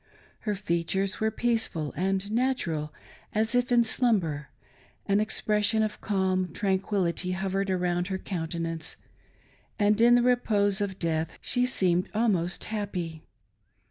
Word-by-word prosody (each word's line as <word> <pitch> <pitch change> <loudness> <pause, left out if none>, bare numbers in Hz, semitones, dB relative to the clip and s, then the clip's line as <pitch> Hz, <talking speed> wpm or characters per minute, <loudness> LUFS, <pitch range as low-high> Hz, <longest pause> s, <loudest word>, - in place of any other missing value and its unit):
Her 210 - +1
features 190 0 -1
were 220 - +2
peaceful 220 -10 -1
and 195 +2 -1
natural 215 - 0 0.4
as 220 +2 +2
if 245 +1 +1
in 240 -1 +5
slumber; 190 - +1 0.6
an 200 0 +2
expression 215 +1 +1
of 215 -1 -3
calm 185 -3 0
tranquility 190 -2 0
hovered 195 +1 -1
around 180 -1 0
her 190 - -2
countenance, 165 -3 -4 0.8
and 210 +1 +3
in 240 +1 +7
the 245 - +4
repose 210 -5 +2
of 195 -2 -2
death 160 -2 -1
she 250 0 0
seemed 180 -7 +1
almost 190 -6 +1
happy. 185 -7 -4
195 Hz, 125 wpm, -27 LUFS, 175-220 Hz, 0.8 s, in